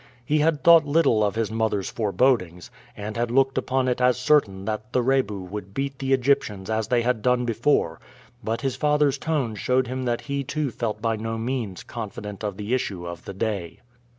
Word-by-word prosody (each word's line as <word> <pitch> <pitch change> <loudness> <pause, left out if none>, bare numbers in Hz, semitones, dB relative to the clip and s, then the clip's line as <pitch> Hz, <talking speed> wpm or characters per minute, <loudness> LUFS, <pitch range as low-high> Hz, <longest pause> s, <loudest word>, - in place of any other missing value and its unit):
He 150 +3 +2
had 150 -1 +1
thought 170 -1 +8
little 145 -7 +3
of 105 0 0
his 115 -1 -1
mother's 110 -3 -1
forebodings, 100 -5 0 0.3
and 105 +1 -5
had 120 0 -1
looked 135 +2 +2
upon 130 0 0
it 125 0 0
as 125 -1 +4
certain 125 -8 +2
that 110 +2 -4
the 125 - +2
Rebu 125 -7 +1
would 100 +1 -8
beat 135 0 -3
the 135 0 -2
Egyptians 120 -7 +1
as 110 -1 0
they 120 -2 +2
had 120 -2 0
done 125 0 +2
before, 115 - +1 0.4
but 115 +1 -2
his 135 -2 -1
father's 150 -2 +2
tone 145 -8 -1
showed 125 +4 +1
him 130 +1 -4
that 120 -1 0
he 140 -1 -3
too 145 0 -2
felt 110 -2 -3
by 115 -1 +1
no 115 +1 -3
means 115 -5 -3
confident 105 -2 -7
of 100 -2 -3
the 105 +3 -3
issue 100 -8 -2
of 85 -1 -7
the 100 - -6
day. 95 -5 -3
120 Hz, 200 wpm, -24 LUFS, 105-135 Hz, 0.4 s, thought